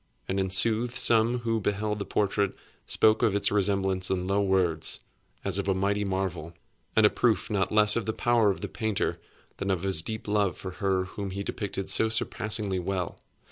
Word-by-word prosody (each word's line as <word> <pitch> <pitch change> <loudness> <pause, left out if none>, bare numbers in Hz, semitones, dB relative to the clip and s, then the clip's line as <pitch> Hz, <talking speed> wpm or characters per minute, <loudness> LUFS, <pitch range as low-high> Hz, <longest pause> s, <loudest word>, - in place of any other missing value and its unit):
And 95 +1 -1
in 95 0 0
sooth 115 +6 +2
some 120 -1 +3
who 115 -1 0
beheld 105 +1 -1
the 100 - -3
portrait 100 -1 0 0.3
spoke 110 0 +3
of 110 -4 +2
its 100 - +3
resemblance 95 -2 +2
in 90 -1 -1
low 100 +2 +1
words, 95 -5 +1 0.5
as 100 0 0
of 100 - -3
a 95 - +2
mighty 100 +2 0
marvel, 95 -4 -3 0.4
and 110 - +5
a - - +7
proof 110 -6 0
not 100 -2 0
less 105 -1 +4
of 115 -3 -2
the - - +1
power 115 -1 +2
of 95 - -2
the - - -3
painter 110 -3 -2 0.4
than 100 - -3
of 95 -2 -1
his 95 -5 +1
deep 110 +6 -6
love 105 -3 +1
for 95 - -7
her 95 -2 +1
whom 100 +1 -6
he 100 +1 -4
depicted 100 -2 -3
so 110 - +4
surpassingly 110 -4 -1
well. 90 -1 -3
100 Hz, 195 wpm, -27 LUFS, 95-110 Hz, 0.5 s, a